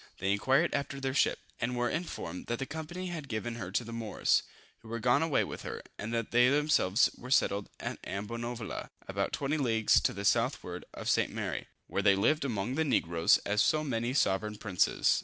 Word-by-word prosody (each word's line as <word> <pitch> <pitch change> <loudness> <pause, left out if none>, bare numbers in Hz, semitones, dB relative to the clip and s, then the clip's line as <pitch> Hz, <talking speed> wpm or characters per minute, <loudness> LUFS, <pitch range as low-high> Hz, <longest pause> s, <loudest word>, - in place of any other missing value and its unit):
They 95 +1 0
inquired 135 +11 +2
after 140 0 -2
their 135 -1 -2
ship, - - +3 0.2
and 125 +1 -1
were 120 0 +1
informed, 120 - -4
that 120 - -1
the 135 - -3
company 165 +5 -5
had 155 -5 -6
given 115 +1 -3
her 95 -6 -5
to 120 - +1
the 115 0 -8
Moors, 115 -2 +1 0.4
who 115 - -16
were 115 +1 -3
gone 125 +5 +3
away 160 -4 +2
with - - -6
her, - - -6 0.2
and 110 +2 -4
that 115 -1 -2
they 125 +1 +5
themselves 140 -8 +3
were 125 - -10
settled 100 -6 +2
at - - -4
Ambonavoula, 115 +3 -5 0.2
about - - -1
20 140 +3 -1
leagues 115 -6 +3
to - - +2
the 100 0 -5
southward 115 -7 0
of - - -6
St. - - +2
Mary, - - -3 0.2
where - - -1
they 100 - +5
lived 150 +11 +2
among 120 -3 -2
the 160 +3 +1
negroes 85 - +3
as 105 +1 +2
so 155 0 +3
many 120 -4 -1
sovereign 105 -3 +1
princes. 100 -5 +2
120 Hz, 200 wpm, -31 LUFS, 105-140 Hz, 0.4 s, they